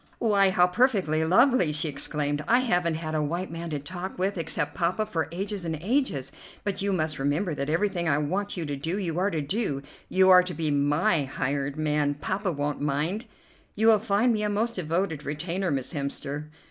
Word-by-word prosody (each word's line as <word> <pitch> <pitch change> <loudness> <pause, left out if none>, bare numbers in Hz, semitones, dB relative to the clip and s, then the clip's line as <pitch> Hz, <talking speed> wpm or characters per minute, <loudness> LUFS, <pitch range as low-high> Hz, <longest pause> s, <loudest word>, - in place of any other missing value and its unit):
"Why, 200 -4 +3
how 180 -1 +4
perfectly 180 - +2
lovely!" 190 - +4
she 155 +2 0
exclaimed. 145 0 -1
"I 245 +2 +4
haven't 175 -9 +1
had 155 -1 -4
a 155 - +1
white 170 +5 -2
man 165 0 -5
to 150 - -2
talk 180 +6 -6
with 190 +2 0
except 155 -3 -2
Poppa 180 +5 0
for 170 -7 -2
ages 195 +2 -4
and 160 -2 -2
ages. 185 - 0 0.3
But 200 -2 -2
you 200 0 0
must 155 -5 -1
remember 150 +6 0
that 140 0 -3
everything 175 0 0
I 140 - +3
want 190 +7 -2
you 170 - -2
to 145 -1 -3
do, 160 +7 -2
you 175 -4 -2
are 195 +2 +2
to 165 -5 -2
do. 145 -3 -1 0.3
You 190 0 +5
are 180 0 +9
to 180 -1 -5
be 160 -2 -1
my 145 +2 +2
hired 140 +1 -2
man; 150 -2 +1
Poppa 190 +7 -2
won't 145 -1 -2
mind." 150 - -1 0.5
"You 220 - +1
will 220 -2 +6
find 220 +3 +2
me 215 - -1
a 210 - 0
most 220 +3 0
devoted 165 -3 -2
retainer, 170 +6 -2
Miss 135 -1 -2
Hemster." 145 +1 -4
170 Hz, 200 wpm, -27 LUFS, 150-195 Hz, 0.5 s, are